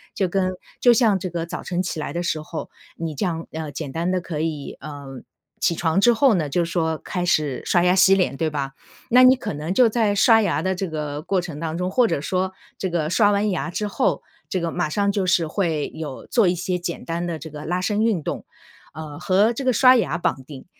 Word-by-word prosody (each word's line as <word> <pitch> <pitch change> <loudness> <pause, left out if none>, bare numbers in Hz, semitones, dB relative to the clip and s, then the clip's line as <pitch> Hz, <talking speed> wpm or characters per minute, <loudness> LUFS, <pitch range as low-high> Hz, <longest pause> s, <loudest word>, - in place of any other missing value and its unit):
就 190 - +1
跟 185 +1 0 0.3
就 245 - +7
像 225 -4 +4
这 185 - -4
个 170 -1 -3
早 170 - -6
晨 180 -1 -2
起 175 -3 -4
来 - - -4
的 170 - -3
时 160 -2 -1
候， 155 +1 -7 0.3
你 165 -1 -4
这 170 - -1
样， 165 -2 -3
呃 160 -2 -5
简 140 0 -6
单 165 +5 -2
地 185 - +1
可 170 -3 -5
以， 155 -3 -4
呃 140 -2 -8 0.4
起 170 - +2
床 165 +3 +1
之 240 +3 +6
后 260 +1 +4
呢 155 -4 0
就 175 +5 +1
是 170 - -5
说 160 -2 0
开 180 -2 -3
始 150 -7 +1
刷 175 - +3
牙 180 0 +4
洗 190 +1 +6
脸 180 -8 0
对 160 -1 0
吧？ 140 -2 -4 0.4
那 250 +1 +7
你 255 +1 +8
可 250 - -5
能 155 +5 -3
就 240 +2 +5
在 215 -2 +1
刷 225 +2 +5
牙 170 -7 0
的 190 +1 0
这 185 +1 -3
个 150 -2 -4
过 185 +3 0
程 165 -4 -7
当 165 0 -3
中， 180 +1 -1
或 245 +3 +3
者 - - -1
说 185 +4 -1 0.2
这 190 - -2
个 165 -3 -1
刷 205 +3 +4
完 205 +1 +1
牙 180 -1 -2
之 210 +5 -3
后， - - 0 0.3
这 185 - -1
个 170 - -2
马 155 - -1
上 200 +5 +1
就 200 -2 -1
是 180 -3 +2
会 160 -4 -1
有 150 -4 -7
做 225 -7 +3
一 180 - +1
些 180 +1 -2
简 170 -1 -5
单 170 +1 -3
的 170 -2 -3
这 160 - -8
个 150 0 -9
拉 175 +3 -1
伸 205 +3 0
运 215 -9 +1
动。 - - -4 0.5
呃 150 -1 -8
和 200 +6 +3
这 270 - -5
个 255 - +4
刷 255 +3 +6
牙 170 -7 0
绑 165 -6 -1
定， 135 -2 -11
175 Hz, 265 characters per minute, -22 LUFS, 155-195 Hz, 0.5 s, 你